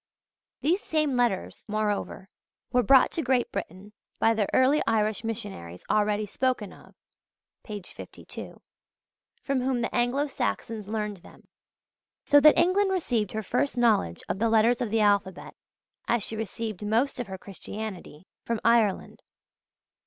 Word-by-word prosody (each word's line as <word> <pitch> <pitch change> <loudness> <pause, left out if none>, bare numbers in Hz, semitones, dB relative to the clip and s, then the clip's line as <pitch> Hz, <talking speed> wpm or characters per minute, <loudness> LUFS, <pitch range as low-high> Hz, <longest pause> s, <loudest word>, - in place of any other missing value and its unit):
These 350 +7 +1
same 305 -7 0
letters, 240 -6 -1
moreover, 210 -2 -2 0.4
were 250 - +3
brought 265 +1 +5
to 330 - -2
Great 255 -3 +1
Britain 190 +5 -7 0.2
by 225 - +3
the 215 -3 0
early 265 +4 +4
Irish 215 -1 +1
missionaries 200 - -6
already 210 0 +1
spoken 240 -1 -2
of - - -18 0.7
(p. 210 -3 -7
52), - - -10 0.8
from 275 -2 0
whom 255 -1 0
the 230 - -2
Anglo 245 +4 +1
Saxons 230 -6 -3
learned 210 -1 -3
them; 175 - -18 0.8
so 290 - +6
that 305 +1 +7
England 375 +4 +3
received 245 - -1
her 220 0 -3
first 250 +5 -1
knowledge 215 - +2
of 190 - -3
the 230 +1 +2
letters 230 +2 +3
of 240 - -1
the 220 +1 +1
alphabet 200 -3 +1 0.5
as 235 -2 +1
she 220 - -4
received 220 -1 -5
most 230 +6 0
of 245 - -3
her 190 -1 -6
Christianity 195 -4 -8 0.2
from 230 -1 -2
Ireland. 230 -4 +2
225 Hz, 145 wpm, -27 LUFS, 205-250 Hz, 0.8 s, that